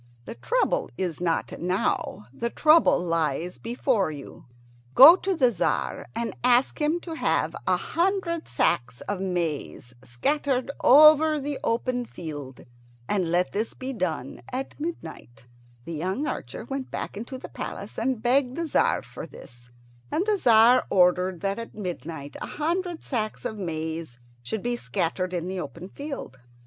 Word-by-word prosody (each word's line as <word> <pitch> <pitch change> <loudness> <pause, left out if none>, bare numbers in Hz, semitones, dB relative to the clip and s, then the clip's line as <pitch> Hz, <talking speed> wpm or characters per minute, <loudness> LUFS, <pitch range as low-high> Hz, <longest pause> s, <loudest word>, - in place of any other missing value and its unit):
The - - -6
trouble - - 0
is 175 -3 -3
not 165 -2 0
now; 180 - -1
the 235 - -2
trouble 310 +6 +5
lies 165 -1 -1
before 235 - 0
you. 145 -3 -10 0.5
Go 310 +6 +11
to 385 0 -1
the 255 -6 +4
Tzar - - -1
and 230 0 -3
ask 250 +4 +3
him 305 +3 +2
to 335 - -7
have 320 - 0
a - - +3
hundred 345 -2 -1
sacks 120 -1 0
of 200 -2 -4
maize 165 -9 -3
scattered 260 - -1
over 305 +2 +7
the 285 0 -4
open 245 +1 0
field, 145 - -8 0.4
and 185 -5 0
let 180 +1 +2
this 215 +3 -2
be 260 +1 -5
done 165 - -3
at 265 +3 -5
midnight." 160 - -7 0.4
The 170 - -6
young 185 - -2
archer 220 - -5
went 270 +1 -5
back - - -5
into 235 +5 -6
the - - -9
palace 200 - -6
and 235 -1 -1
begged 255 +1 +2
the 335 - -2
Tzar 315 - +2
for - - -9
this, 120 -1 -13 0.4
and 360 - 0
the 425 -1 +2
Tzar 240 - +6
ordered 180 -1 +3
that 195 +2 -1
at 230 - -8
midnight 165 -7 -6
a - - -4
hundred 345 +2 -2
sacks 215 -5 -3
of 215 - -4
maize 160 -5 -4 0.2
should 190 - -4
be 240 0 0
scattered 175 - -2
in 175 -1 -3
the 190 0 -3
open 175 0 -7
field. 275 - -7
220 Hz, 155 wpm, -26 LUFS, 170-275 Hz, 0.5 s, Go